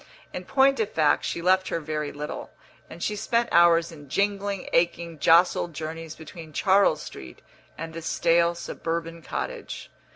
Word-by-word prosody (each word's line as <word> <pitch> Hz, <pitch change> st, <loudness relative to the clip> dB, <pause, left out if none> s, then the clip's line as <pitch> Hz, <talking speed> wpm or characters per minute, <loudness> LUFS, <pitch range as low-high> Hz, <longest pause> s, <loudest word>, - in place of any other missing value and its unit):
In -, -, -6 dB
point 275 Hz, -1 st, +3 dB
of 215 Hz, -2 st, 0 dB
fact, 155 Hz, -2 st, +2 dB
she 170 Hz, -, -3 dB
left 185 Hz, +1 st, +3 dB
her -, -, -1 dB
very 150 Hz, -1 st, -3 dB
little, 150 Hz, +1 st, -6 dB, 0.4 s
and 170 Hz, -, -8 dB
she 210 Hz, -, -1 dB
spent 235 Hz, +3 st, 0 dB
hours 170 Hz, 0 st, +5 dB
in 145 Hz, -4 st, -13 dB
jingling, 200 Hz, +2 st, -1 dB
aching, 170 Hz, -1 st, 0 dB
jostled 170 Hz, 0 st, +4 dB
journeys 160 Hz, +1 st, -6 dB
between 160 Hz, 0 st, -11 dB
Charles 190 Hz, -5 st, +3 dB
Street 65 Hz, -, -10 dB, 0.3 s
and 165 Hz, 0 st, -6 dB
the 165 Hz, -, -6 dB
stale 170 Hz, +1 st, +2 dB
suburban 165 Hz, 0 st, -4 dB
cottage. -, -, -6 dB
170 Hz, 155 wpm, -26 LUFS, 160-185 Hz, 0.4 s, hours